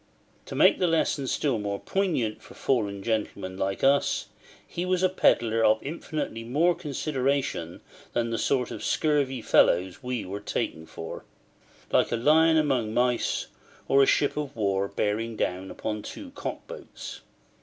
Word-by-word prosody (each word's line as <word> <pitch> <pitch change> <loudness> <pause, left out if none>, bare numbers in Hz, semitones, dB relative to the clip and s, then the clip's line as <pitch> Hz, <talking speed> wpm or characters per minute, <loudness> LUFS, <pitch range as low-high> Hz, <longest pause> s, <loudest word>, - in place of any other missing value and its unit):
To - - -6
make - - +5
the 180 - +3
lesson 160 -4 +1
still 130 -3 0
more 100 -1 -3
poignant 165 - -1
for - - -14
fallen 100 -6 0
gentlemen 105 -4 -2
like 95 +1 -2
us, 140 +1 +2 0.4
he 175 - -4
was 185 0 0
a 185 - +5
pedlar 115 -10 +3
of 110 0 +5
infinitely 150 -5 -4
more 150 +9 +2
consideration 135 - -2 0.3
than 115 -1 0
the 115 - -1
sort 125 -3 +1
of - - -6
scurvy 140 -5 +1
fellows 90 +6 +3
we 125 -3 -3
were 100 +2 -5
taken 80 -5 -3
for: 80 - -7 0.7
like - - +3
a - - +2
lion 160 +6 +5
among 130 -8 +1
mice, 125 -1 +1 0.4
or 140 - +5
a 135 - +5
ship 145 - +2
of 150 -2 -4
war 100 -3 0
bearing 110 +3 -1
down 95 -1 -2
upon 105 -1 -4
two 280 - -8
cock 285 - -6
boats. - - -9
125 Hz, 155 wpm, -27 LUFS, 105-150 Hz, 0.7 s, make